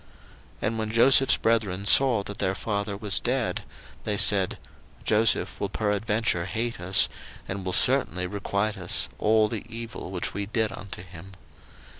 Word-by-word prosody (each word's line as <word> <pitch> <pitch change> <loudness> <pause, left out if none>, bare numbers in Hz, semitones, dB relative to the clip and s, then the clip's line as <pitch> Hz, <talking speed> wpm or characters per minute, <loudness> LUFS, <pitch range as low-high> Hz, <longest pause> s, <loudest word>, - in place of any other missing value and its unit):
01:050:015 - - -28 0.5
And 115 +1 -1
when 110 -1 -3
Joseph's 130 +4 +5
brethren 105 -4 0
saw 120 -1 +5
that 100 0 -8
their 95 +1 -1
father 100 0 -3
was 105 -2 +1
dead, 125 -1 -2 0.4
they 105 -2 -2
said, 95 -2 +3 0.5
Joseph 110 +1 +1
will - - -2
peradventure 105 -3 -1
hate 115 +3 -4
us, 95 +2 +4 0.4
and 95 +1 -5
will 95 - -3
certainly 90 0 +3
requite 100 +2 -3
us 90 -1 +1
all 110 0 +3
the 110 -1 -5
evil 115 -2 -8
which 90 -2 -4
we 100 0 -4
did 110 -1 -1
unto 95 -2 -7
him. 95 +1 -13
105 Hz, 155 wpm, -25 LUFS, 95-115 Hz, 0.5 s, Joseph's